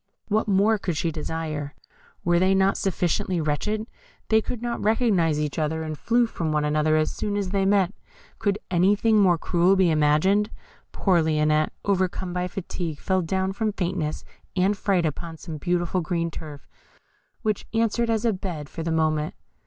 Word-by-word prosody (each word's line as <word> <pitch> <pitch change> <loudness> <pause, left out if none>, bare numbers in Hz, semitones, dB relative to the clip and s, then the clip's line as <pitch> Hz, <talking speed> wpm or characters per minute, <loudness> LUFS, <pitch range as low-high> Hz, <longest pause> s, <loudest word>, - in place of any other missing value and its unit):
What 215 +2 +1
more 205 +2 +3
could 175 -5 -2
she 165 - 0
desire? 155 -2 -4 0.5
Were 175 0 +3
they 190 +1 +3
not 190 +1 +3
sufficiently 180 -1 0
wretched? 210 +9 -1 0.4
They 220 0 +4
could 245 - -5
not 240 0 -3
recognise 205 -9 +2
each 150 +1 -2
other, 160 +1 -1
and 155 -1 -4
flew 235 +9 +2
from 170 -8 -3
one 150 -1 +1
another 155 +1 +2
as 155 0 0
soon 205 -1 -2
as 200 -2 -1
they 195 -1 +1
met. 195 -2 +3 0.5
Could 200 -1 +1
anything 205 +5 +3
more 180 -3 +4
cruel 175 +3 +3
be 185 -3 +3
imagined? 155 +8 +3 0.4
Poor 180 -4 +2
Lionette, 155 -1 +2 0.2
overcome 185 -2 0
by 180 0 -1
fatigue, 175 -4 -5
fell 185 +4 0
down 190 +3 -1
from 215 +1 -1
faintness 175 -5 -2 0.3
and 190 +2 +2
fright 190 -4 +1
upon 160 +2 -4
some 160 -1 -7
beautiful 175 +2 0
green 170 0 -1
turf, 150 -3 -9 0.8
which 215 -3 -1
answered 230 +1 +1
as 225 0 0
a 225 - +3
bed 175 -7 -5
for 165 - -6
the 165 0 -2
moment. 155 -1 0
180 Hz, 170 wpm, -25 LUFS, 155-200 Hz, 0.8 s, They